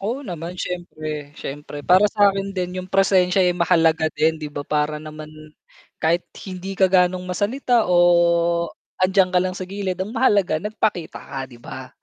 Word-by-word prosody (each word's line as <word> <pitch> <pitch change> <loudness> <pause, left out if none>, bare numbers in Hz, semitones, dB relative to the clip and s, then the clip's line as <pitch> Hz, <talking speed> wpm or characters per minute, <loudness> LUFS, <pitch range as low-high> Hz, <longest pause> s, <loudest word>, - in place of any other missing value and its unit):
Oo 230 +8 -3
naman, 175 - -6
siyempre, 155 -4 -5
siyempre 145 +1 -7
para 185 +7 +5
sa 205 -2 +5
'kin 195 0 -2
din 180 -1 -3
yung - - -14
presensya 190 -1 +3
ay 180 -1 +2
mahalaga 165 -2 +2
din, 160 +1 +1
'di 150 -2 -7
ba, 145 - -4
para 150 +1 -1
naman 155 0 -9 0.6
kahit 170 +2 +1 0.2
hindi 190 0 -6
ka 190 - +4
ga'nong 180 -1 +2
masalita, 220 +4 0
oh, 170 -1 +3 0.3
andiyan 185 0 +3
ka 180 - +4
lang 185 0 -2
sa 185 - -5
gilid, 190 -1 -4
ang 190 +4 -4
mahalaga 205 -10 +2
nagpakita 210 -5 -2
ka, 135 - -8
'di 120 - -14
ba? 130 +2 -9
180 Hz, 170 wpm, -22 LUFS, 160-195 Hz, 0.6 s, para